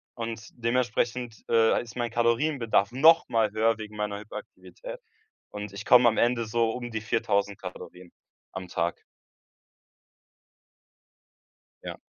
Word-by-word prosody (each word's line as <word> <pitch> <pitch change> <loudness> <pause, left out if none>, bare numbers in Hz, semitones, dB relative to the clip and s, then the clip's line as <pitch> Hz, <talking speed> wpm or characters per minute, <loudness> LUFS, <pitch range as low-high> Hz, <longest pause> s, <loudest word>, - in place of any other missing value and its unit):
und 115 -2 -5
dementsprechend, 120 0 -1
äh, 115 -1 +4
ist 120 0 -11
mein 120 -2 -2
Kalorienbedarf 115 -2 +1
noch 160 +6 +5
mal 110 -2 +2
höher 110 +1 +2
wegen 105 -1 -9
meiner 105 -1 -3
Hyperaktivität - - -10 0.5
und 105 -1 -7
ich - - -7
komme 125 -1 +7
am 110 - +1
Ende 120 -1 +2
so 115 0 +1
um 120 0 -5
die 110 -1 -3
4.000 100 -2 0
Kalorien 90 -1 -10 0.4
am 95 -1 -7
Tag. 85 0 -2 2.8
Ja. - - -6
115 Hz, 125 wpm, -27 LUFS, 105-120 Hz, 2.8 s, komme